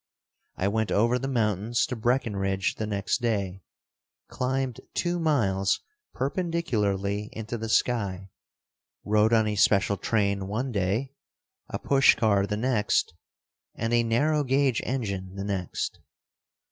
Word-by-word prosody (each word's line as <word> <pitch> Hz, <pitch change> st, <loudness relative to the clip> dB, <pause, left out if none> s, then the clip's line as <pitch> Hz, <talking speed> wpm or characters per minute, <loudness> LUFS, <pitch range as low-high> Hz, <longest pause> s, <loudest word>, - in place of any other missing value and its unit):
I 95 Hz, -, 0 dB
went 110 Hz, +1 st, 0 dB
over 120 Hz, +4 st, +3 dB
the 135 Hz, -, -3 dB
mountains 110 Hz, -2 st, +1 dB
to 125 Hz, -, -4 dB
Breckenridge 100 Hz, -5 st, 0 dB
the 110 Hz, -, -3 dB
next 105 Hz, +3 st, -1 dB
day, 100 Hz, -5 st, -1 dB, 0.7 s
climbed 130 Hz, -1 st, -2 dB
two 175 Hz, 0 st, 0 dB
miles 100 Hz, -, +1 dB, 0.4 s
perpendicularly 110 Hz, -, -1 dB
into 110 Hz, +1 st, -5 dB
the 115 Hz, -1 st, -4 dB
sky, 100 Hz, -6 st, 0 dB, 0.7 s
rode 105 Hz, +1 st, +3 dB
on 110 Hz, -1 st, +4 dB
a 105 Hz, -, -1 dB
special 100 Hz, 0 st, +3 dB
train 100 Hz, -1 st, 0 dB
one 125 Hz, +6 st, -2 dB
day, 110 Hz, +6 st, -1 dB, 0.6 s
a -, -, -3 dB
push 135 Hz, -1 st, +4 dB
car 100 Hz, -3 st, +2 dB
the 105 Hz, -, -2 dB
next 110 Hz, -7 st, +1 dB, 0.6 s
and 115 Hz, +1 st, -2 dB
a 120 Hz, -, +5 dB
narrow 145 Hz, +7 st, +2 dB
gauge 135 Hz, -2 st, +2 dB
engine 100 Hz, -7 st, -3 dB
the 100 Hz, -, -4 dB
next. 95 Hz, -4 st, -3 dB
110 Hz, 130 wpm, -27 LUFS, 100-125 Hz, 0.7 s, a